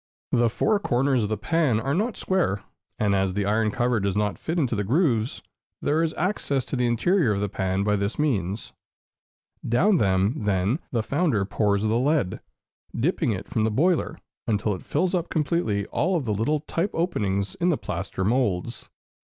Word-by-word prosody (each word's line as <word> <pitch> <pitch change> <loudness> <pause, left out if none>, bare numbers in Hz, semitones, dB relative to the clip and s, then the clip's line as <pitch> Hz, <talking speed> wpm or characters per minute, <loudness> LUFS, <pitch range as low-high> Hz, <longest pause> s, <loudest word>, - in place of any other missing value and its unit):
The 120 -1 +3
four 210 - +1
corners 130 -5 +1
of 105 - -1
the 110 - -1
pan 150 - +1
are 135 +5 -1
not 215 +8 -1
square; 170 - 0 0.3
and 105 -2 +1
as 95 -1 +1
the 100 -1 0
iron 105 +2 +2
cover 120 +1 +1
does 100 0 -1
not 105 -1 -1
fit 165 +2 -3
into 130 -8 +1
the 105 - -1
grooves, 120 - +1 0.4
there 155 +2 +1
is 165 -1 -1
access 150 - -1
to - - -4
the 125 -1 +1
interior 120 - +2
of 100 - -2
the 105 - 0
pan 95 0 -1
by 105 0 +2
this 100 +2 -2
means. 105 - -1 0.9
Down 175 - +3
them, 95 -1 +2
then, 105 - 0
the 115 -3 0
founder 135 - +1
pours 100 0 +1
the 110 +2 +2
lead, 135 - +1 0.6
dipping 155 0 +1
it 95 -3 -4
from 110 - -1
the 110 - +2
boiler, 160 +6 +1 0.3
until 105 -1 +1
it 95 - -6
fills 175 +5 -1
up 175 -2 -1
completely 150 - 0
all 175 - 0
the 120 -7 -2
little 130 +9 0
type 170 +5 -2
openings 100 - -1
in 180 -2 0
the 160 - +2
plaster 95 -1 -4
moulds. 115 -2 -1
120 Hz, 185 wpm, -25 LUFS, 100-160 Hz, 0.9 s, The